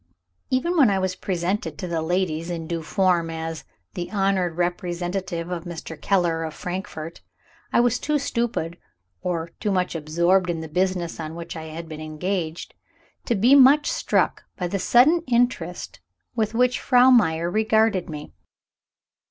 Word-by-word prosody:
Even 335 +8 0
when 270 -8 +6
I 195 - +1
was 190 -1 -1
presented 175 -3 -2
to 180 - -5
the 165 -2 -1
ladies 165 -1 -1
in 165 -2 -4
due 165 0 -3
form, 175 -1 +1
as 160 0 -5 0.3
"the 175 - -5
honored 195 -4 0
representative 175 0 -2
of 170 -2 -3
Mr. 165 -1 -7
Keller, 175 -4 +1
of 160 -1 -5
Frankfort," 175 -3 -6 0.5
I - - +4
was 245 0 +2
too 300 0 0
stupid, 235 - -2 0.4
or 170 -2 -2
too 215 - -1
much 185 -2 0
absorbed 170 +4 +1
in 170 -1 -1
the 160 - -6
business 180 0 -1
on 160 0 -5
which 170 0 -7
I 160 -1 -6
had 160 +1 -7
been 155 -1 -8
engaged, 160 +2 -3 0.5
to 235 - +1
be 235 +7 +4
much 280 - +6
struck - - 0
by 180 - -2
the 195 +3 -2
sudden 265 - +5
interest 235 - 0 0.4
with 220 -1 -1
which 250 +1 +2
Frau 250 0 +5
Meyer 170 -8 +3
regarded 220 -2 +2
me. 150 -1 -8
180 Hz, 160 wpm, -24 LUFS, 165-215 Hz, 0.5 s, when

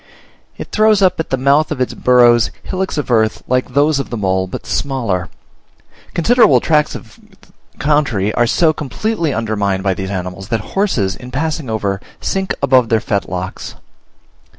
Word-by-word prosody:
It - - -8
throws 215 -2 +3
up 185 - +3
at 160 - -3
the 135 - 0
mouth 140 +4 +2
of - - -3
its 130 - -1
burrows 120 -2 +4
hillocks 190 -2 -3
of 145 -3 -2
earth 110 -2 +1
like 125 0 0
those 145 0 +3
of 140 - -4
the 120 - -4
mole, 95 -2 0
but - - -7
smaller. 115 -10 -2 0.9
Considerable 170 - +4
tracts 150 +3 +1
of - - -11 0.6
country 140 -9 +1
are 120 -1 +2
so 160 +5 +3
completely 165 - -2
undermined 105 -5 -1
by 95 -1 +1
these 95 0 -5
animals, 95 0 -5
that 115 - -1
horses 125 - 0
in 125 - -11
passing 150 0 -3
over, 100 -3 -2 0.2
sink 190 -1 -2
above 130 -4 +4
their 115 - +3
fetlocks. 95 -3 -4
125 Hz, 160 wpm, -16 LUFS, 100-150 Hz, 0.9 s, burrows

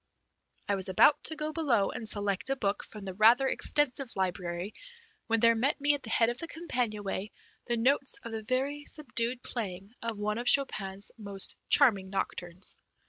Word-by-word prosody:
I 205 - +1
was 190 -1 -1
about 275 +10 +5
to 315 - -3
go 305 0 -3
below 255 -12 +1
and 220 -2 -2
select 205 +3 0
a 270 - +1
book 205 -6 -1
from 210 -2 -9
the 190 - -5
rather 225 +7 +5
extensive 270 -1 -1
library 180 0 -3 0.5
when 230 0 +2
there 230 0 +6
met 250 +7 0
me 290 +1 +3
at 285 - -3
the 225 - -9
head 230 0 +3
of 240 +1 -4
the 330 - -4
companion 250 -11 -3
way 195 +1 -4 0.4
the 240 -1 0
notes 270 +3 +2
of 230 - -7
the 220 0 -4
very 270 +6 -2
subdued 250 -4 -1
playing 195 -3 -4
of 230 -2 -3
one 210 +2 -2
of 245 - -5
Chopin's 200 -8 +4
most 200 -2 -8
charming 200 -9 +4
nocturnes. 180 -2 -2
230 Hz, 185 wpm, -30 LUFS, 200-270 Hz, 0.5 s, there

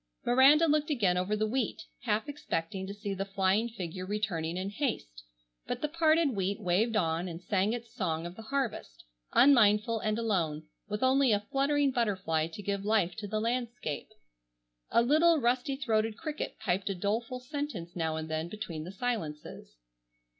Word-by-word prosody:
Miranda 270 +6 +6
looked 305 -1 +2
again 205 -11 +2
over 185 +4 0
the 215 +1 +1
wheat, 235 +1 -2 0.2
half 215 +7 0
expecting 190 - -3
to 200 - -5
see 205 -1 -4
the 195 0 -2
flying 195 +3 +1
figure 185 -4 -6
returning 185 -5 -2
in 190 +2 -3
haste, - - -3 0.5
but - - -2
the - - +2
parted 320 -1 +3
wheat 200 -2 -1
waved 210 +6 +1
on 165 -2 +1
and 170 -1 -6
sang 200 +1 +1
its 235 -1 -5
song 165 -4 -2
of 175 +1 -7
the 225 - -9
harvest, 225 - -3 0.3
unmindful 225 -4 +5
and 215 0 -1
alone, 175 -9 0 0.3
with 210 +3 -2
only 260 -1 +4
a 205 0 +1
fluttering 280 0 +2
butterfly 190 -10 0
to 170 +5 -9
give 200 0 -2
life 205 -4 +1
to 215 -2 -6
the 215 +2 -1
landscape. 235 - -3 0.8
A 235 - +4
little 315 +6 +5
rusty 255 +2 +1
throated 225 -4 0
cricket 305 +1 -5
piped 195 -2 -1
a 195 - -1
doleful 225 +7 -2
sentence 250 - -5
now 160 -2 -1
and 160 0 -4
then 160 +1 -3
between 170 -7 -6
the 180 - -7
silences. 160 - -4
210 Hz, 170 wpm, -30 LUFS, 180-250 Hz, 0.8 s, Miranda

